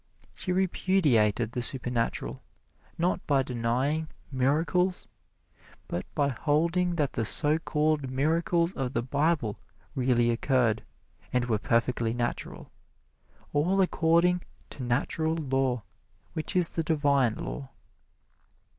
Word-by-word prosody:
She 185 - -4
repudiated 150 - +2
the 125 - -2
supernatural, 120 -2 -2 0.6
not 175 +2 +1
by 140 -2 +3
denying 130 +6 -1 0.2
"miracles," 165 +8 +1 0.8
but 90 - -4
by 145 -1 +2
holding 170 +7 +1
that 145 -5 0
the 115 - 0
so 150 +7 +2
called 150 -3 0
miracles 165 +6 +1
of 135 -1 -3
the 115 - 0
Bible 140 -4 0 0.3
really 125 -2 +2
occurred 115 -3 +1 0.5
and 125 -1 +1
were 110 -3 0
perfectly 115 0 +1
natural 120 0 -3 0.8
all 175 +7 +2
according 180 -1 +3 0.3
to - - -8
Natural 140 +6 0
Law, 135 -6 0 0.5
which 160 +3 -2
is 180 -2 +5
the 165 - -2
Divine 140 -7 +2
Law. 135 -2 -6
140 Hz, 110 wpm, -28 LUFS, 125-165 Hz, 0.8 s, is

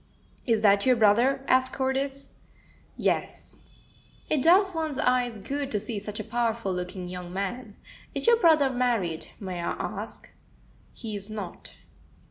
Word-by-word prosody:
"Is 225 -2 +2
that 200 -1 +5
your 255 - +6
brother?" 235 +5 +3
asked 260 0 +3
Cordis. 270 +1 -2 0.6
"Yes." - - -2 0.7
"It 300 - +3
does 375 +5 +5
one's 315 -4 -2
eyes 250 -3 +1
good 275 +7 -4
to 210 - 0
see 215 0 -5
such 210 +1 -6
a - - -3
powerful 230 -3 -1
looking 180 0 -5
young 180 -1 -7
man. 205 +3 -4 0.4
Is - - 0
your 470 0 +6
brother 315 - +4
married, 230 -10 0
may 185 -3 -5
I 170 - -1
ask?" - - -6 0.6
"He 220 -3 -6
is 200 +1 -6
not." 205 -5 -7
235 Hz, 145 wpm, -27 LUFS, 200-270 Hz, 0.7 s, your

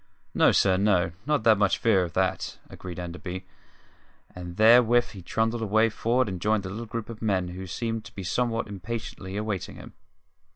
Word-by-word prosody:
"No, - - +5
sir, 95 -2 +3
no; 95 -4 +2 0.2
not 150 -7 +1
much 100 -2 +3
fear 110 -5 +3
of 85 -2 -5
that," 95 0 -1
agreed 90 -2 -8
Enderby; 90 +1 -6 0.9
and 90 0 -8
therewith 120 +2 +6
he 100 - -10
trundled 110 +6 -1
away 110 +1 +3
for'ard 120 +3 0
and 95 -3 -5
joined 105 -1 +1
a - - -4
little 110 +4 -6
group 115 0 -5
of 115 -2 -9
men 95 -5 0
who 95 +2 -7
seemed 115 +4 -3
to - - -13
be 95 - -6
somewhat 115 +4 -1
impatiently 100 -1 -6
awaiting 105 -3 -3
him. - - -12
105 Hz, 175 wpm, -26 LUFS, 95-115 Hz, 0.9 s, therewith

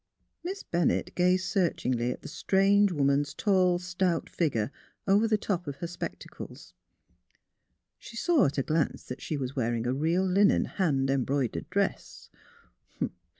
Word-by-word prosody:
" - - -49
Miss 385 +3 -5
Bennett 170 0 0
gazed 180 +1 +2
searchingly 130 - 0
at - - -7
the - - -7
strange 200 +4 +3
woman's 140 -2 +1
tall, 185 -4 +3
stout 180 -1 -1
figure 130 -8 0 0.4
over 205 +3 +4
tlie 215 -1 +2
top 180 -6 -2
of 140 - -4
her 170 - -6
spec 175 +1 -5
tacles. - - -11 1.3
She - - -12
saw 330 0 +3
at 140 - -4
a 135 - +2
glance 155 0 0
that 125 - -8
she 155 - -3
was 130 -1 -4
wearing 120 -2 -1
a 125 - +1
real 165 +7 +1
linen, 195 +2 +4
hand 135 -8 0
embroidered 135 +1 -1
dress. 200 +2 -2
175 Hz, 150 wpm, -28 LUFS, 135-190 Hz, 1.3 s, over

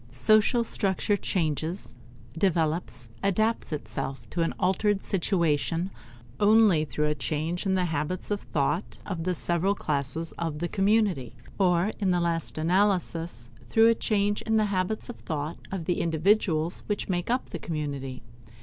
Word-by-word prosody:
Social 215 - +3
structure 200 -2 0
changes, 165 -2 -2 0.4
develops, 160 -8 0
adapts 215 +1 +1
itself 135 0 -4
to 170 - -1
an 165 - +1
altered 195 +2 +1
situation, 170 -1 0 0.5
only 205 -6 +5
through 150 +1 -1
a 150 - +1
change 160 +5 -2
in 190 - +2
the 185 -1 +2
habits 165 +4 -3
of 205 - 0
thought 155 +6 -1
of 170 -5 -4
the 180 -1 0
several 175 +4 0
classes 150 +1 -2
of 165 -3 -2
the 175 +3 -2
community, 195 - +1 0.2
or 180 +1 +3
in 195 -3 +1
the 180 -1 +3
last 170 -2 -1
analysis, 170 - +1 0.2
through 225 - +6
a - - +6
change 205 -2 0
in 220 0 +1
the 215 - +3
habits 185 +3 -1
of 245 - -7
thought 155 -1 -4
of 190 -4 -4
the 175 - 0
individuals 165 0 +1
which 210 - -2
make 175 0 -2
up 250 +2 -1
the - - -5
community. 140 -6 -4
175 Hz, 150 wpm, -27 LUFS, 155-200 Hz, 0.5 s, through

